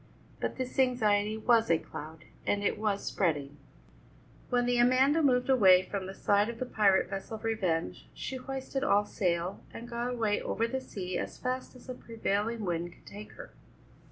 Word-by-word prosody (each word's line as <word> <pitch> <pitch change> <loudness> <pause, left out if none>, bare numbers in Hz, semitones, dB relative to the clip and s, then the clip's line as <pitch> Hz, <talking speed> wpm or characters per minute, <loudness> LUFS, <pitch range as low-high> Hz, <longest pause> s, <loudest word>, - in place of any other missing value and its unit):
But - - -2
this 255 0 -4
anxiety 215 -5 +2
was 230 0 +3
a 165 - +5
cloud, 160 0 -9 0.2
and 205 0 +1
it 205 - 0
was 210 -2 -1
spreading. 145 -6 -1 0.9
When 245 -1 +2
the 245 0 +2
Amanda 260 +6 +4
moved 250 -4 +3
away 190 -9 +6
from 190 0 -4
the 190 - -7
side 205 +2 +2
of 235 - -6
the 255 - -3
pirate 200 -5 +3
vessel 195 +3 -5
Revenge 200 -7 -2
she 265 - -5
hoisted 270 +1 -4
all 205 -7 +3
sail, 175 -2 -1
and 235 - -8
got 240 +1 -3
away 225 -4 0
over 230 - -1
the 265 +2 -3
sea 185 -6 -4
as - - -5
fast 255 +1 -3
as 250 - -14
the 255 - -5
prevailing 225 -2 -2
wind 175 -1 -2
could - - -24
take 205 +1 -10
her. - - -11
220 Hz, 180 wpm, -30 LUFS, 195-250 Hz, 0.9 s, away